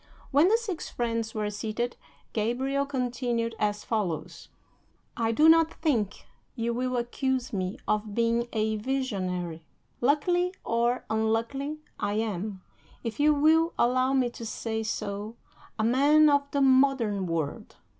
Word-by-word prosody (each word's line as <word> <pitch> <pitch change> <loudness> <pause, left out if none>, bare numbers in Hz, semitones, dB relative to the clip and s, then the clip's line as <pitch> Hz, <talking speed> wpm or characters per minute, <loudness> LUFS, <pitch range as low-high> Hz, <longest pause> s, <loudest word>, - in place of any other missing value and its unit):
When 290 +5 +5
the 440 +4 +4
six 415 -8 -5
friends 230 -2 -2
were 210 -1 -1
seated, 220 +4 -3 0.4
Gabriel 265 +6 0
continued 245 -3 -1
as 210 0 0
follows: 205 -8 -3 0.7
"I 230 -1 0
do 300 +8 +4
not 325 0 +5
think 230 - -1 0.3
you 235 -1 -1
will 255 +1 -1
accuse 255 +1 -1
me 185 -1 -2
of 210 -1 -1
being 235 0 +1
a 220 -1 0
visionary. 185 -10 -2 0.4
Luckily 350 +7 +2
or 235 +2 0
unluckily, 230 +7 -1 0.2
I 205 - -1
am, 210 -3 -3 0.4
if 230 0 -5
you 300 +1 +5
will 320 +3 +4
allow 255 +2 +2
me 255 -3 +2
to 235 - -9
say 220 0 -3
so, 210 0 -4 0.4
a 220 - 0
man 290 +6 +5
of 285 0 +2
the 280 0 0
modern 260 -7 +3
world. 160 -4 -3
235 Hz, 135 wpm, -28 LUFS, 215-275 Hz, 0.7 s, When